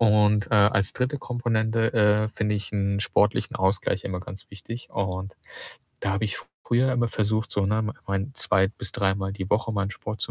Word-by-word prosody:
Und, 105 -2 +4
äh, - - +5
als 100 -2 +4
3. 130 +3 -1
Komponente, 115 -2 0
äh, 105 -2 +4
finde 110 -1 -1
ich 105 0 -4
'n 100 -1 0
sportlichen 105 +2 +1
Ausgleich 95 0 +1
immer 90 -2 -3
ganz 95 +1 -10
wichtig, 115 +5 -9
und 95 0 -3 0.6
da 100 - -1
habe 100 +3 0
ich 105 - -2 0.3
früher 130 +2 +2
immer 120 -2 +1
versucht, 110 +1 0
so, 100 -1 +1
ne, 110 +2 +1 0.2
mein 100 +6 -2
zwei 95 -6 +2
bis 105 - -6
dreimal 95 0 0
die 95 -1 -5
Woche 110 +2 +1
meinen 100 -1 -1
Sport 105 +2 -6
zu - - +1
105 Hz, 185 wpm, -25 LUFS, 100-110 Hz, 0.6 s, äh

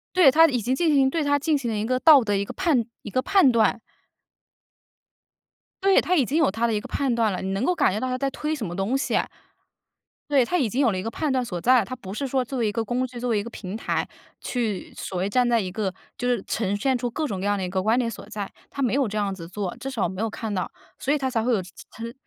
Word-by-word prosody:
对， 320 -8 +7
它 325 +3 +7
已 250 -5 0
经 250 +5 0
进 320 0 +2
行 270 -1 +4
对， 320 +1 -1
它 285 0 +3
进 295 +1 +1
行 245 -4 -3
了 215 - -2
一 210 - -1
个 255 +1 0
道 290 -5 +7
德， 205 -2 0
一 200 - +1
个 - - -8
判 315 - +1 0.2
一 210 - -6
个 255 +5 0
判 385 -8 +4
断。 230 0 +2 2.0
对， 390 0 +5
它 365 - +1
已 275 -7 +3
经 295 +7 -1
有 315 -11 +3
它 230 +3 0
的 225 - 0
一 210 - +1
个 - - -9
判 270 -4 0
断 225 -3 +2
了， 185 - -3
你 190 0 -3
能 195 +5 -1
够 360 - +2
感 335 - +2
觉 210 - -1
到 255 - -2
它 255 - -1
在 275 +1 0
推 300 +3 -3
什 250 -9 -3
么 175 0 -5
东 210 +8 0
西 - - -1
啊。 - - 0 1.0
对， 270 -4 +4
它 360 +5 0
已 240 -6 +1
经 250 - -2
有 240 -6 +4
了 185 - -2
一 - - -3
个 225 - -3
判 300 +3 -2
断 255 -1 +1
所 180 -7 -4
在。 250 +5 +4
它 255 - -6
不 195 -6 -9
是 275 +5 -3
说 260 -1 0
作 260 +1 -4
为 225 - +1
一 - - 0
个 225 +1 -2
工 250 +2 0
具， 245 -1 -9
作 245 -1 -1
为 210 - +2
一 - - -1
个 235 - -7
平 195 -2 -7
台， - - -1 0.3
去 225 -6 -3
所 185 - -5
谓 185 +2 0
站 245 +3 +2
在 235 -1 +3
一 185 -3 -3
个， 195 -1 -2 0.3
就 245 - -1
是 240 -4 +2
呈 205 -2 -1
现 260 +4 +1
出 245 0 -2
各 310 +6 -2
种 195 -8 -3
各 200 - -2
样 205 0 +1
的 190 - -3
一 - - -2
个 190 0 -1
观 220 +4 +2
点 240 -2 +1
所 - - -8
在。 205 -2 -5 0.2
它 275 - -3
没 245 - +1
有 270 -3 +2
这 210 +1 -4
样 200 -2 0
子 165 -3 -8
做， 195 +2 -4
至 270 +2 -5
少 240 -6 -2
我 - - +2
没 190 +3 -5
有 225 - 0
看 215 0 -5
到， 185 -2 -2 0.3
所 275 - -1
以 300 - +3
它 265 -2 -2
才 225 -3 0
会 250 - +1
有 215 - +3
这 185 - -13 0.3
这， 230 +1 -5
它 - - -18
235 Hz, 330 characters per minute, -24 LUFS, 205-270 Hz, 2.0 s, 对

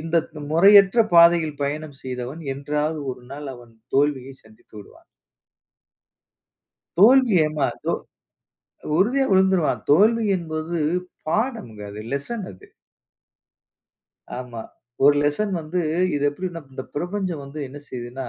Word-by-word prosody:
இந்த 165 +2 -1 0.2
து 155 - -10
முறையற்ற 195 +5 +6
பாதையில் 170 -3 +5
பயணம் 145 0 -4
செய்தவன் 130 +4 -6
என்றாவது 150 +3 -2
ஒரு 125 - -13
நாள், 145 0 -7
அவன் 120 -2 -15 0.2
தோல்விய 135 -2 +1
சந்தித்து 110 -1 -22
விடுவான். 100 - -15 1.9
தோல்வி 245 +1 +6
ஏம்மா, 155 -2 -1 0.2
தோ - - 0 1.1
உறுதியா 250 +9 +2
விழுந்துருவான். 190 -4 +2
தோல்வி 220 +8 +4
என்பது 160 0 -4 0.5
பாடம்ங்க 220 - -2
அது. 105 +1 -8
லெசன் 195 +10 -4
அது. 90 - -16 1.7
ஆமா. 125 -2 -7 0.4
ஒரு 145 +1 +7
லெசன் 170 +8 0
வந்து 160 +3 -4 0.4
இது 145 0 -1
எப்படின்னா 175 +2 -6
இந்த 130 - -6
பிரபஞ்சம் 175 -2 -3
வந்து 140 +2 -9
என்ன 145 - -10
செய்யுதுன்னா, 125 +1 -6
155 Hz, 115 wpm, -22 LUFS, 140-190 Hz, 1.9 s, ஒரு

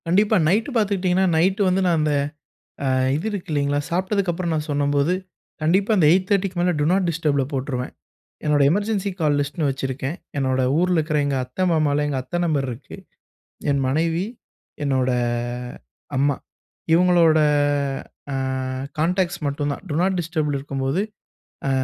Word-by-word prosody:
கண்டிப்பா. 205 +5 +3
நைட்டு 215 - +2
பார்த்துக்கிட்டீங்கன்னா, 190 -4 +2
நைட் 190 +5 +2
வந்து 185 +1 +2
நான் 170 -2 +2
அந்த 150 -1 +1 0.7
அ - - +1 0.3
இது 155 +6 -2
இருக்கு 195 -4 -5
இல்லைங்களா! 145 -1 +1
சாப்பிட்டதுக்கப்புறம், 185 -1 0
நான் 155 0 -2
சொன்னம்போது 145 +2 +1 0.5
கண்டிப்பா, 190 +7 +2
அந்த 170 -6 +4
8:30க்கு 185 0 +1
மேல 180 +1 +2
டூ - - +2
நாட் 185 0 +2
டிஸ்டர்ப்ல 150 -4 0
போட்டுருவேன். 130 -2 -3 0.5
என்னோட 150 -1 +3
எமர்ஜென்சி 205 +2 0
கால் 150 -2 +2
லிஸ்ட்டுன்னு 145 +2 -1
வச்சிருக்கேன். 135 +3 -3 0.2
என்னோட 130 -1 +1 0.2
ஊர்ல 180 +1 +2
இருக்கிற 155 -1 0
எங்க 140 -1 0
அத்தை, 125 +8 -5
மாமாலாம் 150 -2 +2
எங்க 140 -2 -1
அத்த 175 +7 -3
நம்பர் 150 -5 0
இருக்கு. 120 +3 -9 0.8
என் 140 -1 +1
மனைவி, 165 +6 +1 0.6
என்னோட 130 -2 +1 1.1
அம்மா. 140 +1 +2 0.6
இவுங்களோட 170 -2 +5 0.9
அ - - -1 0.6
கான்டாக்ட்ஸ் 180 +2 0
மட்டும் 145 +1 -1
தான். - - -10
டூ 145 - -2
நாட் 190 0 +1
டிஸ்டர்ல 155 -3 -1
இருக்கும்போது, 135 +4 -2 0.7
அ - - +1
160 Hz, 140 wpm, -22 LUFS, 145-185 Hz, 1.1 s, இவுங்களோட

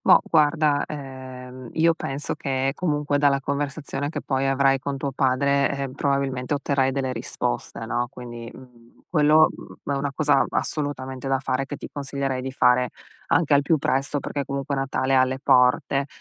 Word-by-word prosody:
Boh - - +6
guarda, 150 -2 +3
ehm, 130 -3 -8
io 165 +1 +4
penso 140 -3 -3
che 135 -1 -1
comunque 150 -4 0
dalla 140 -1 +3
conversazione 140 +1 -3
che - - -5
poi 135 0 0
avrai 135 0 +3
con 140 +1 -4
tuo 140 0 -3
padre, 140 +1 +2
ehm, 135 -1 -4
probabilmente 140 -1 -1
otterrai 140 -2 +1
delle 130 -1 -1
risposte, 85 - -3
no, 120 +1 -1
quindi, 120 -3 -9
mhmm, 120 -2 -17
quello, 155 -1 +5 0.4
mhmm, - - -2
è 140 - -1
una 140 0 -2
cosa 145 -2 +3
assolutamente 135 -3 -3
da 135 -1 +1
fare, 135 0 -1
che 145 - -5
ti - - -8
consiglierei 140 -2 -2
di 130 +1 -5
fare 125 -1 +3 0.4
anche 155 -3 +3
al 140 - +6
più 160 +3 +3
presto, 140 +1 0
perché 140 +1 -3
comunque 140 +1 -3
Natale 135 0 -1
è - - +5
alle 130 +1 +2
porte. 135 +1 +3
135 Hz, 170 wpm, -24 LUFS, 130-145 Hz, 0.4 s, Boh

